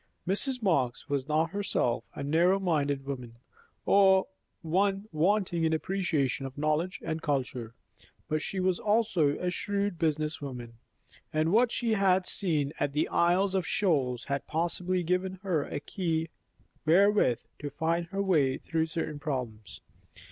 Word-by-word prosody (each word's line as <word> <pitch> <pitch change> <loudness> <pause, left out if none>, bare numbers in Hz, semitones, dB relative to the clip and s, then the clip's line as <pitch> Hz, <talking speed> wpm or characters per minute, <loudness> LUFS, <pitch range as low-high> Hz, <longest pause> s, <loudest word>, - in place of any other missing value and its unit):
Mrs. 250 +6 +1
Marx 140 - +1
was 140 -1 -1
not 155 +2 +1
herself 195 -11 0
a - - -5
narrow 170 +6 +3
minded 145 -7 0
woman, 125 -4 -6 0.5
or 190 -1 +5 0.4
one 195 +5 +1
wanting 175 +1 +1
in 160 0 +2
appreciation 160 -6 -1
of 135 - -12
knowledge 155 +5 0
and 160 0 -3
culture; 125 -5 -2 0.5
but 155 0 -1
she 195 - -3
was 185 -1 +1
also 205 -9 +2
a 180 0 -1
shrewd 200 -1 -1
business 155 -1 0
woman, 120 -4 -7 0.5
and 155 +2 +1
what 235 +2 +4
she 230 -2 0
had 190 -3 +3
seen 155 -8 0
at 140 - 0
the 150 - +1
Isles 185 +3 +2
of 185 -5 0
Shoals 135 - +1
had 140 0 -3
possibly 175 +3 -1
given 180 +2 -1
her 170 -7 0
a 145 - -4
key 165 -1 -2 0.5
wherewith 180 - +4 0.2
to 145 - -4
find 165 +4 -1
her 195 +3 -2
way 150 -9 +2
through 160 -1 -1
certain 155 -2 -4
problems. 125 -8 -5
165 Hz, 150 wpm, -29 LUFS, 145-190 Hz, 0.5 s, or